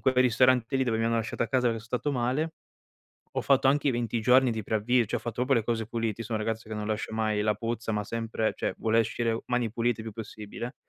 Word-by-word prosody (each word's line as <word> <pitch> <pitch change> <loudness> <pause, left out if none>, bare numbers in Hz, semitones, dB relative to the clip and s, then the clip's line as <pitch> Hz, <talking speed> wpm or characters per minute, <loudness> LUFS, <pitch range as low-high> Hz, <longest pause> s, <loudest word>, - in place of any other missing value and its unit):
quel 130 -1 +2
ristorante 125 +1 +4
lì, 130 - +2
dove 110 -2 0
mi 115 - +1
hanno 115 0 +1
lasciato 115 +1 -1
a - - -7
casa 125 -3 +2
che 115 - -2
so 110 - -12
stato 125 +5 -2
male, 135 +6 0 0.8
ho - - +1
fatto 135 -1 +3
anche 145 +1 +3
i - - +2
20 120 -1 -1
giorni 125 +2 +5
di 110 -2 -2
preavvi 115 +3 +2
cioè, - - -2
ho - - -19
fatto 120 +1 -3
proprio 130 +2 -1
le 115 -3 +2
cose 115 -2 -1
puliti, 115 -1 -2
io - - -6
so 115 - -11
un 110 - +1
ragazzo 110 +1 -3
che 110 - -4
non 105 0 -4
lascia 110 0 -2
mai 110 -1 0
la 105 0 +2
puzza, 115 +1 -3
ma 105 -1 -1
sempre 115 -1 -2
cioè - - -2
vuole 115 0 +2
uscire 115 0 0
mani 125 -2 0
pulite 115 +1 0
il 110 - -6
più 110 - -6
possibile. 110 +3 -7
115 Hz, 265 wpm, -28 LUFS, 110-125 Hz, 0.8 s, giorni